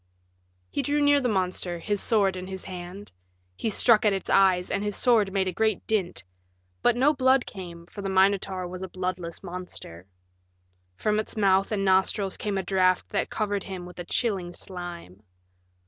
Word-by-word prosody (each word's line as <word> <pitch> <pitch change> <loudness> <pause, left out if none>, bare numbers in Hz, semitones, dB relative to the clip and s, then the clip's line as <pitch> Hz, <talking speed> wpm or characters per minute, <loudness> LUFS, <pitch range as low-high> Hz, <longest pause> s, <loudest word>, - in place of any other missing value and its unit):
He - - 0
drew 290 +2 0
near 285 -1 +4
the 250 - 0
monster, 185 -3 -1
his 205 +4 -1
sword 200 -4 +3
in 185 0 -6
his 190 -1 -7
hand. 185 +2 -8 0.4
He 225 - -2
struck 220 +1 +5
at 210 -2 +4
its 195 - -3
eyes, 185 -2 +4
and 200 - 0
his 205 -1 -2
sword 220 -6 +3
made 190 -1 0
a - - 0
great 220 +3 0
dint. 190 - -1 0.6
But 240 - +3
no 280 +5 +4
blood 260 -1 +3
came, 170 -3 -9
for 200 - -9
the 195 - -3
Minotaur 190 -1 +2
was 180 +1 -7
a 190 - -4
bloodless 180 -2 -4
monster. 175 - -8 0.9
From 215 - 0
its 215 - -5
mouth 195 -1 +3
and 200 -2 0
nostrils 190 +1 +2
came 205 -2 -2
a 190 - -1
draft 185 -1 +2
that - - -1
covered 205 -2 -2
him 185 -2 -6
with 180 0 -11
a - - -3
chilling 185 -3 -1
slime. 175 - -8
190 Hz, 180 wpm, -26 LUFS, 180-210 Hz, 0.9 s, struck